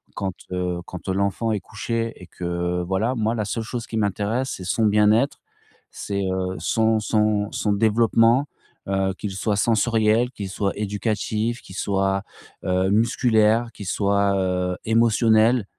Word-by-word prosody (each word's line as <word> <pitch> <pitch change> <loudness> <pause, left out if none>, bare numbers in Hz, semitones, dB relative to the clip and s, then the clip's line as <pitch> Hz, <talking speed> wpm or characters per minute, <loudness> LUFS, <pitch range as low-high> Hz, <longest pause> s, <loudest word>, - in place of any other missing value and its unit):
quand, 95 -2 -3 0.2
heu, 90 -1 -2
quand, 90 - -9
heu, - - +1
l'enfant 100 +4 0
est 105 - 0
couché 115 +4 -3
et 90 - -12
que, 90 0 -2
voilà, 95 +7 0
moi, 110 0 0
la 105 -2 -1
seule 115 +2 -3
chose 120 +1 -5
qui 110 - -5
m'intéresse, 105 +5 -1
c'est 95 - -9
son 100 +5 +1
bien-être, 105 +6 +3 0.5
c'est, 100 -1 -3
heu, 95 0 -2
son 110 -1 +2
son 105 -1 +1
son 105 - 0
développement, 115 +5 +3 0.4
heu, 95 0 0
qu'il 105 - -4
soit 100 +2 -1
sensoriel, 115 +1 +2
qu'il 100 -5 -6
soit 100 0 -1
éducatif, 105 +3 -2
qu'il 95 - -12
soit, 95 0 0 0.4
heu, 95 +1 +1
musculaire, 115 +1 +2
qu'il 100 - -9
soit, 100 0 +1
heu, 90 -1 -1
émotionnel, 115 0 +3
105 Hz, 150 wpm, -23 LUFS, 95-115 Hz, 0.5 s, bien-être